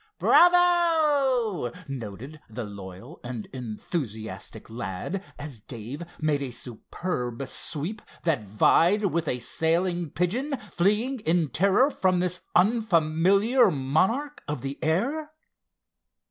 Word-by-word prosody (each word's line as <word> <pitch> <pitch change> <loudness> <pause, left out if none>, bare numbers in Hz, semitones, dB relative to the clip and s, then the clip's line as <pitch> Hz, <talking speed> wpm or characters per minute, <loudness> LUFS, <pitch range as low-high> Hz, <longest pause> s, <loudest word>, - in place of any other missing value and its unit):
"Bravo!" 310 - +4 0.2
voted 135 +3 -7
the 115 +2 -5
loyal 100 - -10
and 120 -3 -5
enthusiastic 110 - -5
lad, 110 - -4
as 145 -6 -7
Dave 120 +6 -8 0.2
made 150 -2 +1
a 135 - -2
superb 125 +2 -4
sweep 170 +11 -2 0.2
that 155 -9 +1
vied 170 - +3
with 170 -3 0
a 125 - 0
sailing 170 +6 0
pigeon, 235 - -1
fleeing 215 +9 +1
in 165 -5 +1
terror 200 - +3
from 185 -7 +1
this 180 0 -1
unfamiliar 200 +3 +4
monarch 185 - 0
of 150 -4 -3
the 135 +1 -5
air. 275 - 0
165 Hz, 105 wpm, -26 LUFS, 125-210 Hz, 0.2 s, Bravo